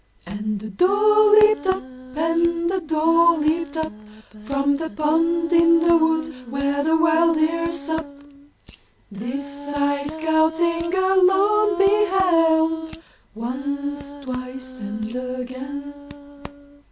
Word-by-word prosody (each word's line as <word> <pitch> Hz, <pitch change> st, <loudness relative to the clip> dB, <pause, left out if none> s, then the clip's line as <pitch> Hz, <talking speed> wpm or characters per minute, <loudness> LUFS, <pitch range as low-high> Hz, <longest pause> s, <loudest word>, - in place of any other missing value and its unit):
And 205 Hz, +2 st, -5 dB
a 215 Hz, -, -7 dB
doe 420 Hz, -, +4 dB
leaped 425 Hz, -2 st, +3 dB
up, 375 Hz, -4 st, 0 dB, 0.3 s
and 335 Hz, +2 st, 0 dB
a 380 Hz, -, -1 dB
doe 330 Hz, +1 st, +3 dB
leaped 310 Hz, 0 st, -1 dB
up 315 Hz, -4 st, -3 dB, 0.5 s
From 280 Hz, +2 st, 0 dB
the 320 Hz, +1 st, -5 dB
pond 330 Hz, +2 st, 0 dB
in 335 Hz, 0 st, +5 dB
the 340 Hz, 0 st, +5 dB
wood 315 Hz, -6 st, -1 dB
where 280 Hz, +2 st, -1 dB
the 320 Hz, +1 st, +2 dB
wild 330 Hz, 0 st, +3 dB
deer 335 Hz, +2 st, 0 dB
sup. 320 Hz, 0 st, -4 dB, 1.0 s
This 280 Hz, +7 st, -6 dB
I, 285 Hz, 0 st, 0 dB
scouting 320 Hz, +2 st, 0 dB
alone, 385 Hz, +2 st, +2 dB
beheld, 335 Hz, -5 st, +2 dB, 0.4 s
Once, 280 Hz, +4 st, -5 dB
twice 255 Hz, 0 st, -7 dB
and 215 Hz, 0 st, -6 dB
again! 255 Hz, +3 st, -6 dB
320 Hz, 105 wpm, -21 LUFS, 280-335 Hz, 1.0 s, in